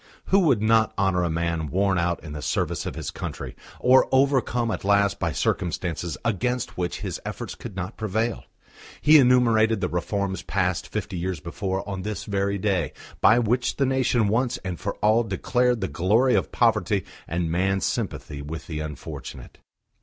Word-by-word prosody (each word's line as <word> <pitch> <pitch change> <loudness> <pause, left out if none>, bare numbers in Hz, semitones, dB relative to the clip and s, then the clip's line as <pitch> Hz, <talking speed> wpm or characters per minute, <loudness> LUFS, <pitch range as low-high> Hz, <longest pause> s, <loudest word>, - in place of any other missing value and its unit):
Who 195 - +5
would 135 - +3
not 110 0 +3
honour 95 -2 +2
a 85 - 0
man 85 -1 -1
worn 95 +3 +1
out 85 0 -1
in 75 -3 -7
the 75 - -6
service - - -1
of - - -5
his - - -4
country, - - -6 0.2
or 130 +1 +5
overcome 130 -3 +2
at - - -4
last 100 0 +2
by - - 0
circumstances 85 -1 -2
against 125 +3 -1
which 90 -1 -3
his - - -4
efforts - - -5
could 95 - -9
not 95 +3 -5
prevail?... 110 +2 -2 0.5
He 150 +1 +7
enumerated 115 -4 +4
the 90 -2 -1
reforms 95 +3 -2
passed 90 -2 -1
fifty 105 -4 -4
years 90 -1 -2
before 95 +4 -4
on 95 -2 -4
this 105 +1 -4
very 100 0 0
day, 95 -6 0 0.3
by 110 - +6
which 120 +2 +1
the 140 - +1
nation 130 -4 +2
once 120 +4 +1
and 90 -2 -4
for - - -3
all 110 +2 +5
declared 120 +3 0
the 95 - 0
glory 105 - +2
of - - +1
poverty 105 -5 +2 0.2
and 85 0 -1
man's 95 +3 +1
sympathy 70 -1 -3
with 80 +2 -6
the 80 -3 -5
unfortunate. 75 -3 -8
100 Hz, 175 wpm, -25 LUFS, 90-115 Hz, 0.5 s, He